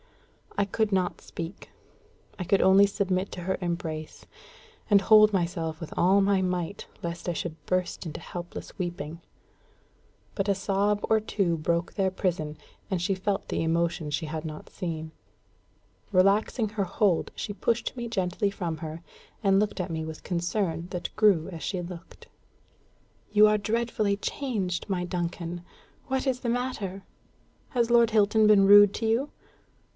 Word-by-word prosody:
I 200 Hz, -, +3 dB
could 215 Hz, +2 st, 0 dB
not 185 Hz, -2 st, 0 dB
speak. 170 Hz, +2 st, -8 dB, 0.7 s
I 185 Hz, -, -3 dB
could 190 Hz, +2 st, +2 dB
only 195 Hz, +1 st, +7 dB
submit 190 Hz, -1 st, -1 dB
to 180 Hz, -, -6 dB
her 190 Hz, +2 st, -1 dB
embrace, 165 Hz, -3 st, -4 dB, 0.6 s
and 205 Hz, -2 st, +7 dB
hold 215 Hz, +1 st, +6 dB
myself 170 Hz, -4 st, -1 dB
with 165 Hz, -, -7 dB
all 190 Hz, +3 st, +4 dB
my 195 Hz, -1 st, +3 dB
might, 180 Hz, +1 st, -2 dB, 0.2 s
lest 170 Hz, +1 st, -4 dB
I -, -, 0 dB
should 165 Hz, 0 st, -5 dB
burst 185 Hz, 0 st, -1 dB
into 155 Hz, -, -6 dB
helpless 175 Hz, 0 st, -8 dB
weeping. 170 Hz, -3 st, -5 dB, 1.1 s
But 200 Hz, 0 st, -1 dB
a 200 Hz, -, +3 dB
sob 200 Hz, +2 st, +1 dB
or 220 Hz, -, +4 dB
two 195 Hz, -5 st, 0 dB
broke 170 Hz, +2 st, -1 dB
their 190 Hz, -2 st, +1 dB
prison, 165 Hz, -5 st, -2 dB, 0.3 s
and 185 Hz, -4 st, -1 dB
she 185 Hz, +3 st, +1 dB
felt 195 Hz, +1 st, -2 dB
the -, -, -1 dB
emotion 165 Hz, -1 st, 0 dB
she 150 Hz, +3 st, -2 dB
had 155 Hz, 0 st, -4 dB
not 155 Hz, -2 st, -7 dB
seen. 160 Hz, -3 st, -5 dB, 1.0 s
Relaxing 205 Hz, +4 st, +3 dB
her 210 Hz, -1 st, -1 dB
hold, 190 Hz, -1 st, +1 dB
she 205 Hz, -, -4 dB
pushed 230 Hz, +5 st, -1 dB
me 240 Hz, -1 st, -4 dB
gently 200 Hz, -2 st, 0 dB
from 175 Hz, -5 st, -4 dB
her, 160 Hz, +1 st, -7 dB, 0.4 s
and 195 Hz, -1 st, +4 dB
looked 210 Hz, -1 st, -1 dB
at 180 Hz, -1 st, -2 dB
me 160 Hz, -1 st, -2 dB
with 160 Hz, 0 st, -7 dB
concern 175 Hz, -1 st, -1 dB
that 180 Hz, -1 st, -5 dB
grew 200 Hz, -7 st, +4 dB
as 165 Hz, -4 st, -7 dB
she 190 Hz, -, -2 dB
looked. 175 Hz, 0 st, -10 dB, 1.0 s
"You 210 Hz, 0 st, +7 dB
are 210 Hz, 0 st, +3 dB
dreadfully 215 Hz, -1 st, 0 dB
changed, 200 Hz, -7 st, -3 dB
my 180 Hz, -2 st, -1 dB
Duncan! 175 Hz, 0 st, -4 dB, 0.5 s
What 265 Hz, 0 st, -1 dB
is 255 Hz, -1 st, +1 dB
the 240 Hz, -, -3 dB
matter? 230 Hz, -6 st, -3 dB, 0.7 s
Has 235 Hz, -2 st, +1 dB
Lord 235 Hz, -1 st, +6 dB
Hilton 215 Hz, 0 st, +4 dB
been 205 Hz, -2 st, +6 dB
rude 205 Hz, 0 st, +8 dB
to 225 Hz, -, -2 dB
you? 235 Hz, +6 st, +1 dB
190 Hz, 160 wpm, -27 LUFS, 170-205 Hz, 1.1 s, rude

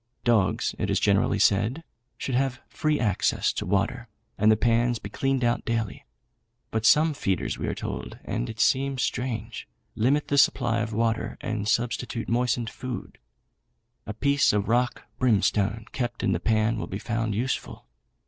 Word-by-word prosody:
Dogs, 110 Hz, -6 st, +2 dB
it -, -, -1 dB
is -, -, +2 dB
generally 100 Hz, 0 st, +2 dB
said, 105 Hz, +10 st, +2 dB, 0.3 s
should 130 Hz, -, -4 dB
have 130 Hz, 0 st, 0 dB
free 155 Hz, -1 st, 0 dB
access 105 Hz, -6 st, +1 dB
to -, -, -3 dB
fresh 90 Hz, -, -5 dB
water, 115 Hz, +5 st, 0 dB, 0.3 s
and 110 Hz, +1 st, +4 dB
the 110 Hz, -, +4 dB
pans 120 Hz, +1 st, +2 dB
be 100 Hz, -2 st, -9 dB
cleaned 135 Hz, +1 st, 0 dB
out 120 Hz, 0 st, +1 dB
daily; 115 Hz, -, -3 dB, 0.6 s
but 110 Hz, 0 st, +1 dB
some 155 Hz, +1 st, +5 dB
feeders, 95 Hz, -10 st, -2 dB
we -, -, -2 dB
are -, -, -2 dB
told, -, -, -5 dB
and -, -, -2 dB
it 110 Hz, -, -8 dB
seems 135 Hz, 0 st, +2 dB
strange, 115 Hz, -3 st, -3 dB, 0.3 s
limit 135 Hz, +7 st, +1 dB
the 140 Hz, -, +3 dB
supply 120 Hz, -4 st, +3 dB
of 110 Hz, 0 st, -2 dB
water, 115 Hz, +1 st, -1 dB
and 105 Hz, -1 st, -3 dB
substitute 120 Hz, 0 st, -1 dB
moistened 120 Hz, 0 st, 0 dB
food. 125 Hz, -1 st, -7 dB, 0.9 s
A 105 Hz, -, -3 dB
piece 140 Hz, +2 st, +3 dB
of 105 Hz, -1 st, 0 dB
rock 120 Hz, +1 st, +1 dB, 0.2 s
brimstone 110 Hz, -2 st, +2 dB
kept 120 Hz, -2 st, -3 dB
in -, -, +2 dB
the 85 Hz, -, 0 dB
pan 110 Hz, +3 st, +1 dB
will -, -, -4 dB
be 95 Hz, -, -4 dB
found 115 Hz, -1 st, -2 dB
useful. 125 Hz, -, -3 dB
115 Hz, 165 wpm, -26 LUFS, 105-125 Hz, 0.9 s, some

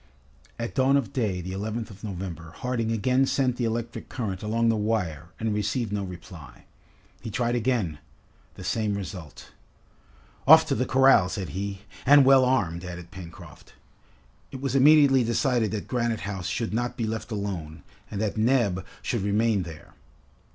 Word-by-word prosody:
At 115 Hz, -, -4 dB
dawn 135 Hz, +1 st, +3 dB
of 120 Hz, -9 st, -3 dB
day, 100 Hz, -7 st, -1 dB
the 90 Hz, +2 st, -6 dB
11th 110 Hz, +3 st, -4 dB
of 100 Hz, 0 st, -14 dB
November, 90 Hz, -5 st, -6 dB
Harding 120 Hz, -3 st, -1 dB
again 130 Hz, +4 st, +2 dB
sent 130 Hz, -3 st, +1 dB
the 120 Hz, -, 0 dB
electric 115 Hz, +1 st, -4 dB
current 100 Hz, -7 st, -4 dB
along 115 Hz, +2 st, 0 dB
the 115 Hz, -, +3 dB
wire 105 Hz, -8 st, -1 dB
and 110 Hz, -1 st, -1 dB
received 105 Hz, +1 st, -1 dB
no 100 Hz, -1 st, -1 dB
reply. 90 Hz, -4 st, -10 dB, 0.6 s
He -, -, -6 dB
tried 120 Hz, +2 st, -1 dB
again: 115 Hz, -, 0 dB, 0.6 s
the 95 Hz, -, -9 dB
same 105 Hz, +2 st, -1 dB
result. 95 Hz, -6 st, -8 dB, 1.0 s
"Off -, -, +9 dB
to -, -, +2 dB
the -, -, 0 dB
corral," 130 Hz, -7 st, +5 dB
said 95 Hz, -4 st, -4 dB
he. 100 Hz, +4 st, -4 dB, 0.2 s
"And 145 Hz, 0 st, +7 dB
well 135 Hz, -1 st, +7 dB
armed!" 90 Hz, -10 st, 0 dB
added 90 Hz, -1 st, -8 dB
Pencroft. 85 Hz, -3 st, -12 dB, 0.7 s
It 135 Hz, -, -8 dB
was 135 Hz, -1 st, -2 dB
immediately 140 Hz, -1 st, +6 dB
decided 120 Hz, -1 st, +1 dB
that 105 Hz, -1 st, -4 dB
Granite 120 Hz, -3 st, -1 dB
House 95 Hz, -3 st, -4 dB
should 110 Hz, +3 st, -2 dB
not 120 Hz, +2 st, -2 dB
be 115 Hz, -, -1 dB
left 110 Hz, +1 st, -4 dB
alone 90 Hz, -8 st, -5 dB, 0.3 s
and 100 Hz, -, -5 dB
that 110 Hz, 0 st, -1 dB
Neb 110 Hz, -5 st, +2 dB, 0.2 s
should 120 Hz, -, -1 dB
remain 105 Hz, +1 st, +1 dB
there. 80 Hz, -3 st, -10 dB
110 Hz, 165 wpm, -26 LUFS, 95-120 Hz, 1.0 s, Off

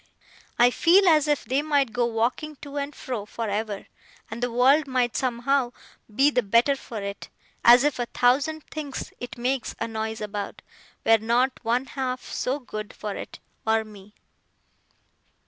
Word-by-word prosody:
I 245 Hz, +1 st, +6 dB
feel 365 Hz, +8 st, +5 dB
as 310 Hz, -3 st, +5 dB
if 295 Hz, -1 st, +1 dB
they 265 Hz, +3 st, +1 dB
might 285 Hz, -6 st, +1 dB
go 240 Hz, +1 st, +1 dB
walking 240 Hz, +7 st, -1 dB
to 285 Hz, 0 st, -7 dB
and 285 Hz, 0 st, -3 dB
fro 245 Hz, -5 st, -4 dB
for 230 Hz, 0 st, -4 dB
ever, 205 Hz, -1 st, -3 dB, 0.5 s
and 225 Hz, +2 st, -6 dB
the 245 Hz, 0 st, -1 dB
world 270 Hz, +5 st, +4 dB
might 250 Hz, -3 st, 0 dB
somehow 250 Hz, 0 st, 0 dB, 0.4 s
be 275 Hz, +4 st, +5 dB
the 250 Hz, -, +2 dB
better 235 Hz, +6 st, +3 dB
for 235 Hz, -4 st, -7 dB
it 200 Hz, 0 st, -6 dB, 0.3 s
as 245 Hz, +2 st, +8 dB
if 290 Hz, -3 st, +1 dB
a 240 Hz, -, -1 dB
thousand 285 Hz, +7 st, +1 dB
things 295 Hz, -3 st, -6 dB
it 245 Hz, +1 st, -7 dB
makes 250 Hz, +1 st, -1 dB
a 230 Hz, -, -1 dB
noise 220 Hz, 0 st, -4 dB
about, 205 Hz, -1 st, -5 dB, 0.4 s
were 225 Hz, 0 st, +6 dB
not 240 Hz, +4 st, +1 dB
one 240 Hz, +3 st, 0 dB
half 255 Hz, -2 st, -3 dB
so 260 Hz, +3 st, -2 dB
good 215 Hz, -6 st, -7 dB
for 210 Hz, -2 st, -5 dB
it, -, -, -8 dB, 0.3 s
or 220 Hz, 0 st, +3 dB
me. 210 Hz, -1 st, -15 dB
245 Hz, 165 wpm, -25 LUFS, 225-275 Hz, 0.5 s, as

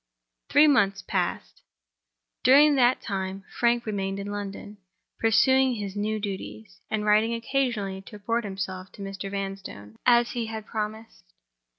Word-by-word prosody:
Three 295 Hz, +1 st, +6 dB
months 205 Hz, -10 st, +3 dB
passed. -, -, -3 dB, 0.8 s
During 290 Hz, +4 st, +7 dB
that 255 Hz, -2 st, +3 dB
time 190 Hz, -1 st, -4 dB, 0.2 s
Frank 235 Hz, 0 st, +2 dB
remained 195 Hz, -2 st, -2 dB
in 200 Hz, +1 st, -5 dB
London; 205 Hz, 0 st, -6 dB, 0.4 s
pursuing 260 Hz, +3 st, +4 dB
his 200 Hz, -2 st, -5 dB
new 215 Hz, +1 st, -1 dB
duties, 200 Hz, 0 st, -7 dB
and 215 Hz, -1 st, -1 dB
writing 215 Hz, +2 st, +3 dB
occasionally 230 Hz, -6 st, -1 dB
to -, -, -10 dB
report 230 Hz, +3 st, -1 dB
himself 190 Hz, -2 st, -5 dB
to 200 Hz, -, -9 dB
Mr. 195 Hz, 0 st, -6 dB
Vanstone, 195 Hz, -, -6 dB
as 240 Hz, -1 st, +5 dB
he 235 Hz, -2 st, -3 dB
had 220 Hz, -1 st, -6 dB
promised. 215 Hz, -, -6 dB
210 Hz, 135 wpm, -26 LUFS, 195-235 Hz, 0.8 s, During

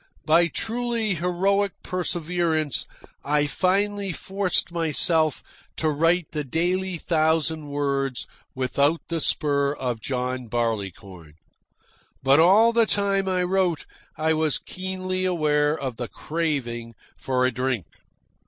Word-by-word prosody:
By 170 Hz, +2 st, +5 dB
truly 230 Hz, +1 st, -1 dB
heroic 190 Hz, +3 st, +1 dB
perseverance 170 Hz, -4 st, -1 dB, 0.4 s
I 145 Hz, 0 st, +2 dB
finally 195 Hz, +4 st, 0 dB
forced 190 Hz, 0 st, -1 dB
myself 160 Hz, -1 st, +1 dB, 0.3 s
to 155 Hz, -1 st, +1 dB
write 165 Hz, +2 st, +1 dB
the 150 Hz, -1 st, -2 dB
daily 175 Hz, +6 st, -1 dB
thousand 160 Hz, -1 st, +1 dB
words 140 Hz, -2 st, -1 dB, 0.3 s
without 140 Hz, +5 st, +1 dB
the 165 Hz, -1 st, -1 dB
spur 140 Hz, -2 st, +1 dB
of 125 Hz, -5 st, -3 dB
John 125 Hz, -1 st, -3 dB
Barleycorn. 100 Hz, -8 st, -4 dB, 0.9 s
But 135 Hz, +2 st, +5 dB
all 205 Hz, +8 st, +6 dB
the 230 Hz, -1 st, +4 dB
time 195 Hz, -1 st, +1 dB
I 180 Hz, -1 st, +1 dB
wrote 180 Hz, -3 st, 0 dB, 0.3 s
I 160 Hz, +1 st, +2 dB
was 155 Hz, -3 st, +1 dB
keenly 185 Hz, 0 st, -4 dB
aware 150 Hz, -4 st, +2 dB
of 130 Hz, -4 st, -4 dB
the 120 Hz, -, -4 dB
craving 125 Hz, -9 st, -3 dB, 0.2 s
for 130 Hz, -1 st, 0 dB
a 130 Hz, -, +2 dB
drink. 125 Hz, -7 st, -1 dB
160 Hz, 115 wpm, -24 LUFS, 140-185 Hz, 0.9 s, all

